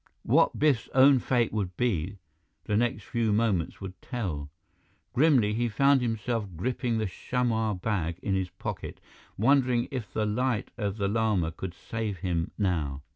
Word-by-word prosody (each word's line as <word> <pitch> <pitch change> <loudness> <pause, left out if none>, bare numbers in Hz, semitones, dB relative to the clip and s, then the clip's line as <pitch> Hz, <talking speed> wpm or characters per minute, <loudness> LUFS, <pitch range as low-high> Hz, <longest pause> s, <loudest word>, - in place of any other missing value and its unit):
What - - +3
Biff's 145 -6 +2
own 135 0 +7
fate 120 -3 +1
would 95 -5 -2
be, 100 -5 0 0.5
the 105 - -1
next 120 +2 0
few 115 -2 0
moments 105 -6 +1
would 95 -2 -8
tell. 90 - -4 0.6
Grimly, 125 -7 +4
he 120 +2 0
found 140 +5 +4
himself 115 -1 -1
gripping 120 - -1
the 110 - 0
chamois 110 +1 -1
bag 90 -4 -2
in 100 - 0
his 95 -1 0
pocket, - - -6 0.4
wondering 125 +1 +3
if 125 -6 -5
the 110 - 0
Light 115 +1 -1
of 105 -3 -3
the 100 -2 0
Lama 105 -6 +1
could 90 +1 -7
save 110 +2 -4
him 85 -1 -1
now. 80 -9 -1
110 Hz, 155 wpm, -28 LUFS, 95-120 Hz, 0.6 s, own